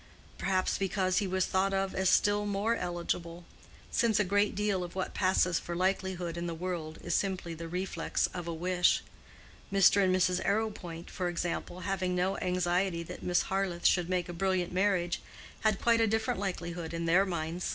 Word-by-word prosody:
Perhaps 185 -1 0
because 190 -1 +1
he 200 - -1
was 185 0 +1
thought 195 +1 +1
of 195 0 0
as 190 -1 +2
still 205 +1 +3
more 205 +3 +1
eligible; 175 -1 -3 0.5
since 225 -3 +2
a - - +4
great 205 +2 +1
deal 205 -3 0
of 175 0 -8
what 190 - -3
passes 185 -2 +2
for 170 - -5
likelihood 185 -2 -1
in 170 0 -3
the 165 - -3
world 165 -2 -4
is - - -2
simply 185 -4 -1
the 165 +1 -7
reflex 180 +3 -1
of 175 -1 -5
a - - -2
wish. 180 +2 +2 0.7
Mr. 195 0 +5
and 185 - +3
Mrs. 180 0 +2
Arrowpoint, 200 -6 -2
for 180 -1 -2
example, 175 +1 -3
having 185 -1 -1
no 185 +2 +1
anxiety 180 -1 0
that - - -9
Miss 175 -1 +2
Harleth 190 -3 -2
should 175 -1 +4
make 180 -1 0
a 175 - -6
brilliant 180 0 0
marriage, 185 -2 +1 0.4
had 215 -2 +1
quite 230 -1 +3
a 225 - +4
different 220 -2 0
likelihood 170 -4 -4
in 165 0 -2
their 175 +4 +5
minds. 170 -2 -3
185 Hz, 185 wpm, -31 LUFS, 175-195 Hz, 0.7 s, Mr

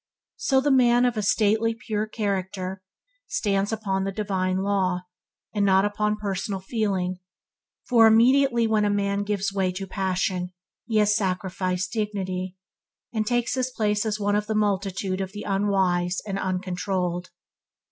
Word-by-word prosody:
So 270 - +1
with 265 - +3
the 290 - +2
man 245 -2 +5
of 235 -4 0
stately 220 +2 +2
purity 215 -2 -3
of - - -39
character, 190 -2 -3 0.5
he - - -14
stands 200 -1 +1
upon 200 -3 -1
the 195 - -2
divine 190 -2 -1
law, 190 -3 +1 0.5
and 205 -2 +1
not 195 0 +4
upon 210 +1 0
personal 200 -1 -3
feeling, 190 -3 -1 0.7
for 230 -3 +6
immediately 240 +2 +4
a 215 -2 +2
man 200 0 0
gives 200 -1 -1
way 190 -2 +1
to 195 +1 -5
passion 185 -1 -2 0.3
he 225 -2 0
has 210 0 +4
sacrificed 185 -2 -1
dignity, 190 -4 -3 0.6
and 215 -2 -1
takes 240 -1 +1
his 255 -1 0
place 210 -4 0
as 215 -1 -2
one 205 0 +1
of 210 0 0
the 220 - -1
multitude 195 -2 0
of 190 0 -5
the 210 - -6
unwise 190 -3 +1
and 195 -2 -3
uncontrolled. 185 -1 -2
200 Hz, 155 wpm, -25 LUFS, 185-215 Hz, 0.7 s, for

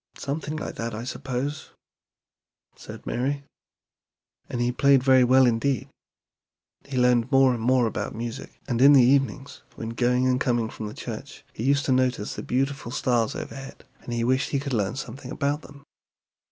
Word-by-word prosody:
"Something 150 +2 -4
like 155 - -5
that, 115 -1 -4
I 115 - -5
suppose," 135 +3 -4 1.0
said - - -11
Mary; 140 +4 -2 1.1
"and 120 - -3
he 120 0 +1
played 135 +1 +4
very 130 -1 +6
well 130 +1 +5
indeed. 120 +1 0 1.0
He 140 -2 -5
learned 125 0 +3
more 135 -1 +5
and 120 - -4
more 125 +1 +3
about 110 - -3
music, 115 +2 -7
and 120 -2 -1
in 140 +2 +8
the 135 -3 +7
evenings 135 +1 +1
when 115 - -5
going 125 +2 +1
and 130 0 +1
coming 120 -3 0
from 110 - -6
the 105 - -8
church - - -8
he 110 - -6
used 140 +1 +2
to - - 0
notice 130 -4 +1
the - - -6
beautiful 135 0 -2
stars 120 -3 0
overhead, 135 0 -8 0.2
and - - -8
he 120 -1 -1
wished 130 +3 +1
to 140 -2 -2
learn 105 +1 -1
something 130 0 -7
about 145 +3 -1
them." 140 -2 -14
130 Hz, 170 wpm, -25 LUFS, 120-140 Hz, 1.1 s, in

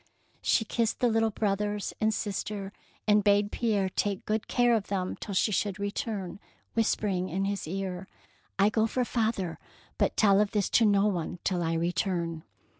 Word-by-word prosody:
^' - - -35 0.4
She 220 - +2
kissed 230 0 0
the 245 - +3
little 225 0 +2
brothers 205 -1 -1
and 220 0 +3
sister, 205 -1 -3 0.3
and 210 0 +5
bade 205 0 +3
Pierre 210 -5 +1
take 195 +1 -2
good 215 0 -1
care 245 -1 +3
of 220 -3 0
them 185 -2 -2
till 200 - -6
she 210 - +2
should 205 -1 0
return, 200 -1 -3 0.3
whis 225 -1 +2
pering 185 -3 -2
in 190 +3 -1
his 200 -4 -2
ear, 190 +1 -4 0.2
— - - -32
" - - -36
I 200 +1 +5
go 220 0 +2
for 250 +2 0
father, 220 -8 -1 0.4
but - - +1
tell 200 -2 +5
of 210 - 0
this 205 -3 0
to 230 - +5
no 200 0 +4
one 180 -3 -1
till 180 -2 0
I 165 -1 0
return. 170 -1 -1
205 Hz, 190 wpm, -29 LUFS, 190-215 Hz, 0.4 s, and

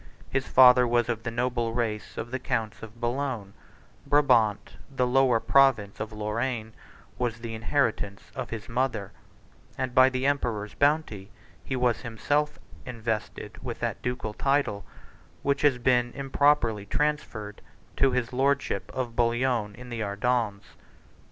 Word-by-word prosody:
His 135 0 -1
father 125 -1 +7
was 120 0 +1
of 115 -2 -1
the 115 - -3
noble 120 -1 -1
race 110 -3 -3
of 120 - -5
the 130 - -2
counts 115 -5 -2
of 110 +1 -11
Boulogne: 120 -4 -2 0.5
Brabant, 120 -8 +3
the 135 -2 0
lower 125 -2 +3
province 120 -7 +3
of 110 0 -4
Lorraine, 110 +2 -3 0.5
43 - - 0
was 120 -1 -1
the 115 -1 -6
inheritance 110 -4 -1
of 125 -3 -5
his 115 -3 -6
mother; 120 -5 -1 0.7
and 130 -1 -2
by 130 0 +7
the 130 0 -2
emperor's 115 -7 -1
bounty 140 -10 0 0.3
he 130 - -3
was 125 -2 +1
himself 145 +6 -1 0.3
invested 115 -4 -5
with - - -5
that - - -2
ducal 125 -4 -3
title, 135 -6 0 0.6
which 140 0 +1
has 145 -4 +4
been 125 0 +2
improperly 135 -6 +2
transferred 120 -7 -2 0.4
to 135 - +4
his 125 -1 -1
lordship 130 -7 0
of 120 -3 -3
Bouillon 120 -3 +1
in 125 +1 -11
the 115 -1 -4
Ardennes. 105 0 -1
120 Hz, 145 wpm, -27 LUFS, 110-130 Hz, 0.7 s, father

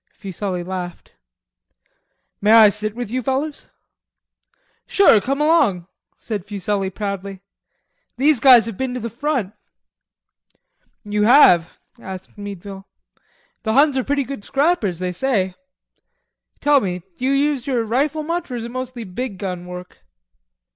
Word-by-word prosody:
Fuselli 190 -2 -4
laughed. 180 -1 -7 1.3
"May 210 +2 +4
I 220 -2 +9
sit 210 +1 -4
with 240 -3 -5
you 255 +1 -1
fellers?" 275 +4 -3 1.2
"Sure, 370 - +5
come 275 +6 -2
along," 290 - +2 0.3
said 210 -5 -5
Fuselli 200 -1 -2
proudly, 195 -1 -5 0.7
"these 285 +1 +3
guys 250 -2 +7
have 225 -4 -6
been 260 -1 -2
to - - -3
the 230 -1 -5
front." 245 -5 -2 1.5
"You 210 0 -2
have?" 195 - +5 0.2
asked 190 -3 -9
Meadville. 200 -1 -9 0.7
"The 220 - -1
Huns 280 +2 +4
are 260 - 0
pretty 280 +1 0
good 265 -5 -7
scrappers, 270 - 0
they 180 +1 -3
say. 190 -2 0 1.1
Tell 290 -1 +4
me, 180 -4 -3
do - - -9
you 270 - +2
use 280 -2 0
your 250 -4 0
rifle 280 +7 0
much, 335 +1 -3
or 250 - -4
is 235 - -4
it 235 - -7
mostly 255 -1 -5
big 205 +2 -5
gun 180 -2 -5
work?" 180 - -10
225 Hz, 140 wpm, -20 LUFS, 195-270 Hz, 1.5 s, I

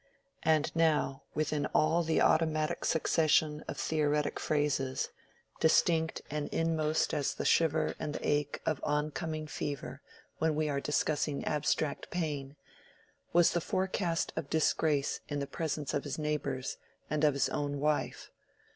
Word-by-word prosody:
And 155 -1 +2
now 155 -5 +2
within 150 -1 0
all 165 +2 +4
the 160 -1 +1
automatic 155 -1 +2
succession 155 -1 +2
of - - -5
theoretic 150 +1 0
phrases—distinct 155 +3 0
and 150 0 -3
inmost 160 -1 +1
as 145 -3 0
the - - -4
shiver 160 -1 +3
and 150 -1 -3
the - - -3
ache 145 0 0
of 155 -4 0
oncoming 155 +1 -2
fever 145 -1 -5 0.4
when 160 -1 +2
we 155 0 +1
are 140 -1 -1
discussing 150 0 0
abstract 150 0 0
pain, 145 -5 -3 0.8
was 175 -1 +5
the 170 - 0
forecast 185 -1 -1
of 140 - -4
disgrace 155 -2 +1
in 145 - -2
the 140 - -1
presence 150 0 -3
of 145 - 0
his 145 -2 -4
neighbors 145 -4 -2 0.3
and 150 +1 -1
of 150 -2 +4
his 140 - +2
own 145 -1 -2
wife. 150 +1 -1
150 Hz, 140 wpm, -31 LUFS, 145-160 Hz, 0.8 s, was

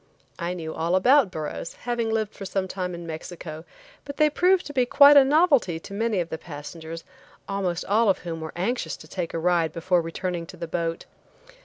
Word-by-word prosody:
I 175 +1 -2
knew 160 -2 -5
all 170 +3 0
about 250 +4 +5
burros, 155 0 -5
having 240 -2 -2
lived 220 -1 -1
for 200 - -9
some 190 0 -2
time 180 -1 -4
in 170 0 -8
Mexico, 160 0 -7 0.4
but 280 0 -8
they 305 0 +4
proved 360 +4 +3
to 290 - -7
be 255 -2 +3
quite 280 +4 +7
a 280 - +9
novelty 280 - +3
to 195 - -11
many 220 -1 0
of 170 -1 -2
the 160 - -5
passengers, 160 +1 -8 0.4
almost 185 -3 -2
all 215 +2 +3
of 190 - +3
whom 165 -2 -6
were 160 - -5
anxious 185 -2 -2
to 155 - -14
take 175 +1 -4
a - - -3
ride 170 -1 +2
before 175 +2 +1
returning 170 +1 -4
to 180 - -11
the 170 0 -5
boat. 165 0 -3
180 Hz, 205 wpm, -25 LUFS, 165-230 Hz, 0.4 s, a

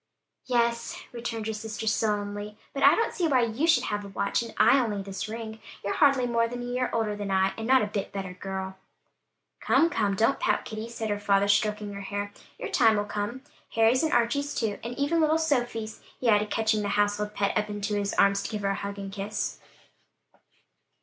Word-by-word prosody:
"Yes," 235 -2 0
returned 230 -2 -4
her 220 - -2
sister 220 +1 -5
sullenly; 210 -1 -1 0.2
"but 275 - -4
I 280 - +7
don't 455 - 0
see 345 - 0
why 260 -5 +3
you 235 +8 0
should 330 - +4
have 205 0 -2
a - - -8
watch 200 +3 -1
and 230 -1 -6
I 275 - +6
only 210 -5 -1
this 195 +1 -5
ring; 220 0 -6 0.3
you're 200 - 0
hardly 275 -4 +4
more 230 -1 +2
than 245 +1 -5
a - - -5
year 250 +1 -1
older 220 -2 0
than 205 -1 -5
I 190 0 +3
am - - -8
and 225 +1 -5
not 260 -1 +5
a - - +1
bit 205 -1 -4
better 190 -2 -5
girl" 190 0 -5 0.8
"Come, 335 +1 +3
come, 205 - +1
don't 225 +7 +2
pout, - - +1
Kitty," 220 +1 -6
said 225 -2 -3
her 205 - -1
father, 200 -1 +2
stroking 210 0 +1
her 200 - -6
hair; 205 +1 -4 0.2
"your - - -5
time 225 -3 +4
will 205 - 0
come. 210 +5 -4 0.3
Harry's 225 +3 +4
and 320 - 0
Archie's 280 +5 +1
too, 215 -4 -1
and 240 +1 -5
even 300 +4 +1
little 310 0 +3
Sophie's," 240 -8 -1 0.2
he 250 - -1
added, 210 -1 +3
catching 220 -1 +1
the 205 - -2
household 205 0 0
pet 200 -1 0
up 210 0 0
in 205 -1 -5
his 205 -1 -1
arms, 200 0 +4
to - - -4
give 210 -1 -4
her 195 - +1
a - - +1
hug 200 +1 -5
and 195 -1 -6
kiss. 200 +2 -3
215 Hz, 215 wpm, -27 LUFS, 205-240 Hz, 0.8 s, I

